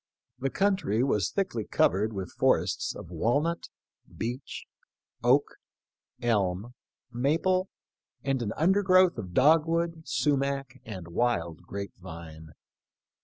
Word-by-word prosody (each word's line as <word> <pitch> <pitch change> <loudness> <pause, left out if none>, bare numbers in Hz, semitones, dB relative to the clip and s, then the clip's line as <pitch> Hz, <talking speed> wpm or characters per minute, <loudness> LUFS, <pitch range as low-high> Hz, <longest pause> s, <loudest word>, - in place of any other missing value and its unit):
The 135 +1 0
coun 195 +6 +2
try 115 - 0
was 105 -8 +1
thickly 185 - -1
covered 105 +2 +2
with 95 -4 -5
forests - - +1
of - - -9
walnut, 145 - 0 0.5
beech, 125 +4 -5 0.6
oak, 130 +4 +5 0.8
elm, 105 -1 0 0.4
maple, 165 +10 +1 0.5
and 135 -2 0
an 110 -3 -2
undergrowth 185 - +4
of 90 -4 -7
dog 155 +4 +5
wood, 165 0 -1
sumac, 140 -2 0
and 95 -6 -7
wild 85 -6 0
grape 100 0 -5
vine. 80 -3 -10
125 Hz, 115 wpm, -28 LUFS, 100-160 Hz, 0.8 s, oak